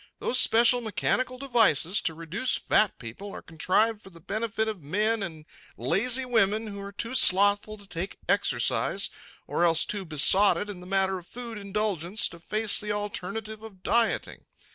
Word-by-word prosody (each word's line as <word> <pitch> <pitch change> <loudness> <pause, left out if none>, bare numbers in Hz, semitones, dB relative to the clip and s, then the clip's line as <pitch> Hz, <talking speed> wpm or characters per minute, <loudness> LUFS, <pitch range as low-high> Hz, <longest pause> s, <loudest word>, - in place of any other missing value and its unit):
Those 250 - +1
special 240 +2 +5
mechanical 250 +3 -1
devices 225 - +2
to 160 - -2
reduce 180 +10 -1
fat 215 -3 +1
people 125 - -9
are - - -9
contrived 205 +7 0
for 195 - -14
the 170 -3 -16
benefit 220 +4 -3
of 215 -5 -5
men 210 +9 -1
and 160 -5 -7 0.3
lazy 250 +5 0
women 220 -3 +1
who 200 -2 -8
are 200 0 -8
too 230 +4 -5
slothful 205 -1 +4
to 205 - -13
take 185 +2 -5
exercise - - +1 0.3
or 170 - -1
else 165 -2 +4
too 205 -2 -4
besotted 190 +6 +4
in 190 - -10
the 180 - -12
matter 190 0 0
of 175 - -17
food 235 -1 -8
indulgence 200 -2 -1
to 170 - -13
face 215 +4 -1
the 210 0 -4
alternative 205 +1 -5
of 200 -4 -13
dieting. 230 +4 0
205 Hz, 165 wpm, -26 LUFS, 185-220 Hz, 0.3 s, special